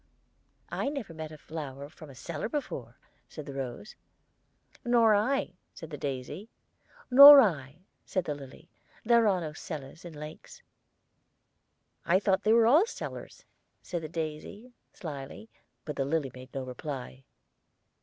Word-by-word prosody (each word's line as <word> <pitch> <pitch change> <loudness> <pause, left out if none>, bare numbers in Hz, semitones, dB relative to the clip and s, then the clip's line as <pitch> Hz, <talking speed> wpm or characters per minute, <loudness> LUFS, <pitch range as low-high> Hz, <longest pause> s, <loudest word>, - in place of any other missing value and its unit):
"I - - -1
never 275 - -6
met 160 -1 -7
a 155 - -10
flower 145 -3 -7
from 155 0 -14
a 135 - -13
cellar 125 - -5
before," 135 - -5 0.3
said 155 - -9
the 140 - -8
rose. 135 - -6 0.9
"Nor 235 -2 +4
I," 210 -3 0 0.2
said 160 -1 -10
the - - -4
daisy. 140 - -5 0.6
"Nor 280 +2 +12
I," 155 - 0 0.2
said 185 - -2
the 150 - -2
lily. 145 +4 -12 0.3
"There 235 -1 +5
are 190 -3 +2
no 155 -2 -5
cellars 155 -1 -8
in 175 -2 -9
lakes." 155 - -11 1.4
"I 180 +2 +3
thought 195 -2 +1
they 215 - +2
were 230 0 +5
all 305 - +5
cellar," - - -7 0.6
said 175 -2 -4
the 155 - -7
daisy, 165 +9 -6 0.2
slyly; 150 +5 -8 0.3
but 150 -2 -6
the 135 - 0
lily 145 -2 -1
made 130 +1 -12
no 135 - -4
reply. 130 0 -7
160 Hz, 145 wpm, -29 LUFS, 140-220 Hz, 1.4 s, Nor